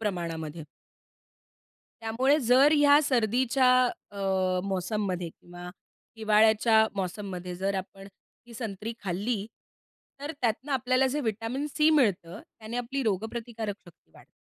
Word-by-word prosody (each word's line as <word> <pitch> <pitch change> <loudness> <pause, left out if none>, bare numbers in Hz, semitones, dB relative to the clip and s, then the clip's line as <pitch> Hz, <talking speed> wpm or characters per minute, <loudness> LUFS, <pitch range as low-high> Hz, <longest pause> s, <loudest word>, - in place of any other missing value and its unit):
प्रमाणामध्ये. 165 -6 -4 1.4
त्यामुळे 255 +6 +2
जर 265 +5 +6
ह्या 290 0 +6
सर्दीच्या 255 0 +2 0.4
अ, 200 - -9 0.4
मौसममध्ये 190 -2 -2
किंवा 175 +2 -11 0.5
हिवाळ्याच्या 220 +1 +4
मौसममध्ये 185 -2 -5
जर 195 +2 -1
आपण 195 +1 -7 0.4
ही 235 - -13
संत्री 220 0 -5
खाल्ली, 200 +3 -2 0.7
तर 290 +3 -5
त्यातनं 245 +4 -1
आपल्याला 255 0 +2
जे 280 +3 -2
व्हिटॅमिन 225 +5 -3
सी 305 +2 +2
मिळतं, 200 - +1 0.2
त्याने 220 +2 -6
आपली 265 +3 -3
रोगप्रतिकारक 220 +1 -3
शक्ती 165 - -20
वाढते. - - -18
220 Hz, 110 wpm, -28 LUFS, 190-250 Hz, 1.4 s, जर